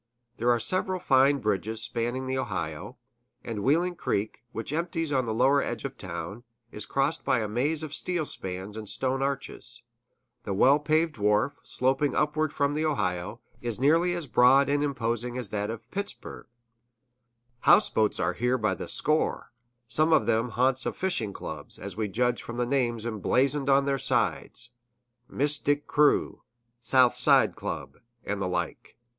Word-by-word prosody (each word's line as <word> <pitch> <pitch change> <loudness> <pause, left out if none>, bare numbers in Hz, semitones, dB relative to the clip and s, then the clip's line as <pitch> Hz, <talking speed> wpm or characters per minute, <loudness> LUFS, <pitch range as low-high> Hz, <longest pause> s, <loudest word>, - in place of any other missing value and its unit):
There 120 +2 +1
are 120 -1 +3
several 185 - -1
fine 135 -1 +4
bridges 110 0 -1
spanning 120 +3 -2
the 130 0 -2
Ohio; 95 -1 -4 0.5
and 110 -3 -4
Wheeling 170 - +2
Creek, 110 -6 -2
which 115 +5 -5
empties 165 -1 -2
on 130 -3 +1
the 110 - -2
lower 130 +5 +3
edge - - -4
of 135 -1 -5
town, 90 +5 -7 0.3
is 105 -1 -7
crossed 140 +4 0
by - - +2
a 110 -2 -1
maze 145 +9 0
of 155 -2 -6
steel 175 -2 -2
spans 95 -3 -4
and 110 -2 -7
stone 135 0 -1
arches; 140 0 -2 0.6
the 100 - -3
well 135 +8 +5
paved 155 -2 0
wharf, 105 +6 +2
sloping 135 +3 0
upward 150 0 +1
from 140 0 0
the 155 +1 -1
Ohio, 90 - -2 0.2
is 120 -2 -2
nearly 165 +6 +3
as 170 -3 -2
broad 130 +3 +5
and 145 +1 +1
imposing 120 -3 -2
as 125 -5 -2
that 105 0 -2
of 115 0 -7
Pittsburg;[A] 200 +1 -6 1.2
houseboats 110 -1 +4
are 85 +2 0
here 125 +4 0
by 110 -3 0
the - - -7
score, 155 -5 0 0.3
some 155 +8 +2
of - - +4
them 115 +1 +1
the 115 - -11
haunts 130 +1 +1
of - - -4
fishing 155 - -1
clubs, 75 -6 -7
as 100 +1 -7
we 110 0 -1
judge 120 +4 0
from 120 - -7
the 120 - +1
names 120 -3 0
emblazoned 135 +6 +1
on 135 0 +4
their 140 -1 0
sides 120 0 -1 0.6
"Mystic 145 +1 0
Crew," 150 0 +2 0.4
"South 125 +1 +4
Side - - +4
Club," - - -6 0.2
and 100 0 -3
the 95 - 0
like. 90 - -4
125 Hz, 165 wpm, -27 LUFS, 110-145 Hz, 1.2 s, well